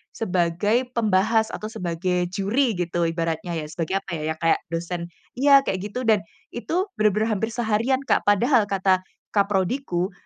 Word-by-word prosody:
sebagai 205 Hz, +5 st, 0 dB
pembahas 220 Hz, +1 st, +2 dB
atau 215 Hz, -, -6 dB
sebagai 180 Hz, -2 st, -1 dB
juri 215 Hz, +5 st, +1 dB
gitu 175 Hz, -1 st, -1 dB
ibaratnya 165 Hz, +1 st, -2 dB
ya, 155 Hz, -2 st, -3 dB
sebagai 175 Hz, +4 st, -1 dB
apa -, -, -12 dB
ya, 155 Hz, +1 st, -2 dB
kayak 165 Hz, 0 st, +2 dB
dosen 170 Hz, +1 st, -3 dB, 0.3 s
iya, 275 Hz, 0 st, +6 dB
kayak 185 Hz, -, -1 dB
gitu. 250 Hz, +3 st, -3 dB
Dan 215 Hz, -2 st, +5 dB, 0.3 s
itu 350 Hz, -, -1 dB
benar-benar 215 Hz, +1 st, +2 dB
hampir 220 Hz, -, -1 dB
seharian, 235 Hz, +3 st, +1 dB
Kak. -, -, +1 dB
Padahal 220 Hz, +2 st, +4 dB
kata 190 Hz, -1 st, +2 dB, 0.4 s
Kaprodiku, 195 Hz, -1 st, 0 dB
195 Hz, 145 wpm, -24 LUFS, 175-225 Hz, 0.4 s, iya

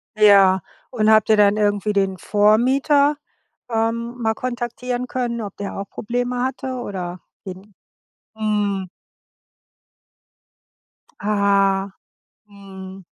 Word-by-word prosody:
Ja. 200 Hz, -3 st, +6 dB, 0.3 s
Und 215 Hz, -4 st, +1 dB
habt 215 Hz, 0 st, +4 dB
ihr 215 Hz, -, +5 dB
dann 205 Hz, 0 st, +4 dB
irgendwie 205 Hz, 0 st, 0 dB
den 195 Hz, -2 st, 0 dB
Vormieter, 260 Hz, -, +3 dB, 0.5 s
ähm, 230 Hz, +1 st, -1 dB
mal 220 Hz, -1 st, +1 dB
kontaktieren 245 Hz, +1 st, -4 dB
können, 240 Hz, -2 st, -3 dB
ob 205 Hz, -3 st, -7 dB
der 200 Hz, -, -5 dB
auch 200 Hz, 0 st, -6 dB
Probleme 245 Hz, +2 st, -3 dB
hatte? 260 Hz, 0 st, -3 dB
Oder 185 Hz, -6 st, -5 dB, 0.3 s
den 190 Hz, +2 st, -10 dB, 0.6 s
mhm. 205 Hz, -3 st, -1 dB, 2.3 s
Ah. 200 Hz, -1 st, +1 dB, 0.6 s
Mhm. 195 Hz, -2 st, -11 dB
210 Hz, 100 wpm, -21 LUFS, 195-240 Hz, 2.3 s, Ja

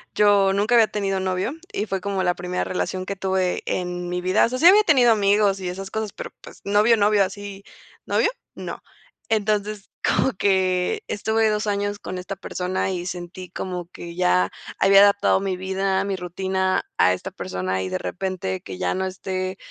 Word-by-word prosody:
Yo 200 Hz, -2 st, +4 dB
nunca 210 Hz, +4 st, +2 dB
había 225 Hz, -2 st, +6 dB
tenido 195 Hz, -2 st, -1 dB
novio 185 Hz, +6 st, -1 dB, 0.2 s
y 210 Hz, -, -1 dB
fue 195 Hz, -3 st, -2 dB
como 195 Hz, -1 st, -2 dB
la 180 Hz, -, +2 dB
primera 180 Hz, +1 st, -3 dB
relación 185 Hz, 0 st, -3 dB
que 200 Hz, -, -4 dB
tuve 190 Hz, -1 st, 0 dB
en 180 Hz, -1 st, -3 dB
mi 180 Hz, 0 st, -2 dB
vida. 185 Hz, +3 st, +3 dB
O -, -, -2 dB
sea, 255 Hz, -, -3 dB
sí 335 Hz, -, +7 dB
había 415 Hz, +3 st, +8 dB
tenido 260 Hz, -, +5 dB
amigos 205 Hz, -2 st, +3 dB
y 185 Hz, -, -4 dB
esas 190 Hz, +2 st, -6 dB
cosas, 220 Hz, -2 st, -3 dB
pero, -, -, -7 dB
pues, -, -, -13 dB
novio, 210 Hz, +3 st, +4 dB
novio 205 Hz, -1 st, +3 dB
así, 200 Hz, +1 st, -6 dB, 0.4 s
novio, -, -, +2 dB, 0.3 s
no. -, -, -7 dB, 0.5 s
Entonces, 210 Hz, -1 st, -1 dB
como 265 Hz, -, +2 dB
que 185 Hz, -1 st, +1 dB
estuve 220 Hz, +2 st, +1 dB
2 210 Hz, 0 st, -1 dB
años 205 Hz, 0 st, -1 dB
con 185 Hz, -, -6 dB
esta 190 Hz, +2 st, -5 dB
persona 185 Hz, 0 st, -2 dB
y 175 Hz, -1 st, -4 dB
sentí 180 Hz, 0 st, -7 dB
como 180 Hz, -1 st, -5 dB
que 170 Hz, 0 st, -9 dB
ya 90 Hz, -, +2 dB, 0.3 s
había 195 Hz, 0 st, +7 dB
adaptado 200 Hz, -1 st, +4 dB
mi 195 Hz, -1 st, -2 dB
vida, 190 Hz, +1 st, -1 dB
mi 200 Hz, -1 st, -2 dB
rutina 190 Hz, +1 st, -1 dB
a 90 Hz, -, +5 dB
esta 90 Hz, -, -6 dB
persona, 95 Hz, 0 st, -3 dB
y 95 Hz, -, -3 dB
de 95 Hz, 0 st, -2 dB
repente 95 Hz, -, -3 dB
que 95 Hz, -, -8 dB
ya 90 Hz, -, 0 dB
no 190 Hz, 0 st, -1 dB
esté, 185 Hz, 0 st, -4 dB
190 Hz, 190 wpm, -23 LUFS, 180-205 Hz, 0.5 s, había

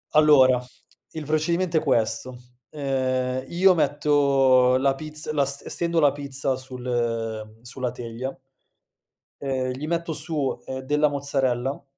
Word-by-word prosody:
Allora, 130 Hz, -5 st, +6 dB, 0.5 s
il 160 Hz, -1 st, -6 dB
procedimento 165 Hz, +3 st, 0 dB
è -, -, +2 dB
questo: 125 Hz, -2 st, 0 dB, 0.3 s
ehm, 130 Hz, -2 st, -1 dB
io 185 Hz, +4 st, +4 dB
metto 140 Hz, -4 st, +3 dB
la 135 Hz, +1 st, +2 dB
pizza, 155 Hz, +1 st, -5 dB
la 145 Hz, -2 st, +2 dB
ste 140 Hz, +1 st, -4 dB
stendo 170 Hz, -1 st, 0 dB
la 145 Hz, -2 st, +5 dB
pizza 140 Hz, -1 st, -2 dB
sul 130 Hz, -1 st, -9 dB
ehm 115 Hz, -2 st, -3 dB
sulla 125 Hz, 0 st, -4 dB
teglia 120 Hz, +2 st, -6 dB, 1.1 s
ehm 130 Hz, -2 st, -1 dB
gli 140 Hz, +4 st, -5 dB
metto 170 Hz, -1 st, -2 dB
su, 150 Hz, -2 st, -2 dB
ehm, 130 Hz, 0 st, -5 dB
della 150 Hz, +3 st, +2 dB
mozzarella 135 Hz, -2 st, -1 dB
135 Hz, 130 wpm, -24 LUFS, 125-150 Hz, 1.1 s, Allora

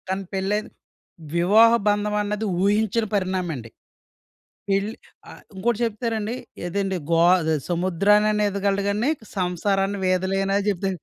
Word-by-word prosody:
తనకి 190 Hz, 0 st, -3 dB
పెళ్ళయింది 200 Hz, +3 st, -1 dB, 0.7 s
వివాహ 215 Hz, +7 st, +6 dB, 0.2 s
బంధం 210 Hz, 0 st, +1 dB
అన్నది, 210 Hz, +1 st, -2 dB, 0.2 s
ఊహించని 215 Hz, +2 st, +1 dB
పరిణామమండి. 180 Hz, -, -2 dB, 1.0 s
పెళ్లి 200 Hz, +3 st, 0 dB, 0.3 s
ఆహ్, -, -, -12 dB
ఇంకోటి 220 Hz, +4 st, -1 dB
చెప్తానండి, 225 Hz, 0 st, -3 dB, 0.3 s
ఏదండీ 190 Hz, +1 st, -2 dB
గో 165 Hz, -, +4 dB, 0.2 s
అదే 160 Hz, -1 st, 0 dB, 0.2 s
సముద్రాన్నయినా 205 Hz, +4 st, +2 dB
ఈదగలడు 200 Hz, 0 st, -1 dB
గానీ, 215 Hz, +7 st, 0 dB, 0.3 s
సంసారాన్ని 195 Hz, +2 st, 0 dB
వీదలేనని 195 Hz, +2 st, +1 dB
చెప్తా 195 Hz, -1 st, -1 dB
200 Hz, 110 wpm, -23 LUFS, 185-210 Hz, 1.0 s, వివాహ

